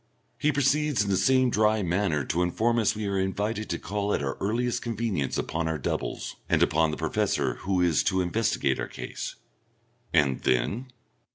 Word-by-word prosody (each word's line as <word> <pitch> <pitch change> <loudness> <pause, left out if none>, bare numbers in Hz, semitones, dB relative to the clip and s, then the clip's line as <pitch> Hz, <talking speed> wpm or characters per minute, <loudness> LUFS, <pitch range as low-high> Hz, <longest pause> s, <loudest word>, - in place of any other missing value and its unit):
He 150 - +2
proceeds 145 -2 +2
in 100 - -2
the - - +3
same 130 +4 +3
dry 110 -1 +2
manner 85 -5 0
to 85 - 0
inform 115 +7 +1
us 110 0 +2
we 105 0 -3
are 100 -1 0
invited 105 +3 -2
to 85 - -1
call 105 +2 -1
at - - -2
our 70 0 -2
earliest 120 +4 0
convenience 115 - -2
upon 80 0 -2
our 80 -1 -1
doubles, 70 - -3
and - - +4
upon 80 +1 +2
the 75 - -3
Professor, - - 0
who 95 -2 +1
is 85 -4 +3
to 95 -1 +2
investigate 105 +6 0
our - - -2
case. - - -6 0.8
"And 70 -5 +3
then?" 80 - 0
100 Hz, 180 wpm, -27 LUFS, 85-115 Hz, 0.8 s, and